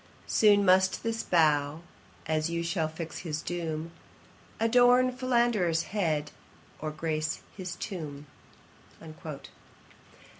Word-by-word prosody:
Soon 205 -2 +4
must 190 0 +4
this 225 0 -1
bough, 150 -2 +2 0.4
as 155 +1 0
you 170 0 -2
shall 165 -1 0
fix 160 +1 -7
his 155 -3 -4
doom, 165 -2 -4 0.7
Adorn 245 +2 +5
Philander's 235 -10 +1
head, 155 -7 0 0.5
or 155 - -3
grace 155 +1 -2
his 180 -3 -5
tomb.' 150 -8 -6
170 Hz, 100 wpm, -29 LUFS, 155-210 Hz, 0.7 s, Adorn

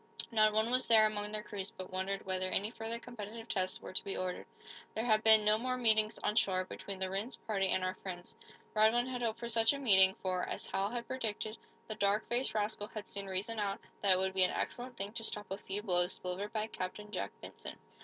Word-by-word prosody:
Not 215 -1 +5
one 220 +2 +2
was 255 +1 +2
there 220 -1 +7
among 210 -1 -1
their 215 0 -4
crews 195 -2 -4
but 185 0 -9
wondered 195 +1 -2
whether 185 0 0
any 205 +3 +1
further 230 0 -4
competitive 230 -1 -8
tests 190 -5 -1
were - - -9
to - - +1
be 195 - -4
ordered. 185 -1 -3 0.5
There 220 - -1
had 215 -2 +3
been 220 -1 +7
no 215 +1 +4
more 255 +1 -1
meetings, 220 -2 +4
on 210 - +1
shore, 185 -4 +2
between 195 +1 -6
the 190 0 -1
Rhinds 200 +6 -2
party 195 -3 0
and 185 0 +1
our 185 0 0
friends. 185 -1 -7 0.4
Radwin 220 +3 +4
had 250 -1 -4
hoped 230 -1 -1
for 235 - -5
such 225 +1 +4
a - - -3
meeting, 190 -8 +6
for, 185 -1 0
as - - -4
Hal 195 +1 -1
had 235 +1 -4
predicted, 220 -3 -2 0.3
the 220 - -3
dark 205 0 +1
faced 240 0 +1
rascal 210 0 -1
had 215 -1 -7
soon 200 -1 -2
reasoned 205 +4 -2
out 200 -1 -1 0.2
that 195 -2 +5
it - - +3
would 190 0 0
be 190 - +3
an 180 - +4
excellent 245 0 -3
thing 200 +2 -3
to 230 - -3
stop 210 -3 -2
a 195 - -2
few 205 +2 -4
blows 180 -3 +1
delivered 185 +3 -4
by 215 -1 -1
Captain 210 0 -6
Jack 100 - -2
Benson. - - -8
210 Hz, 235 wpm, -34 LUFS, 190-225 Hz, 0.5 s, there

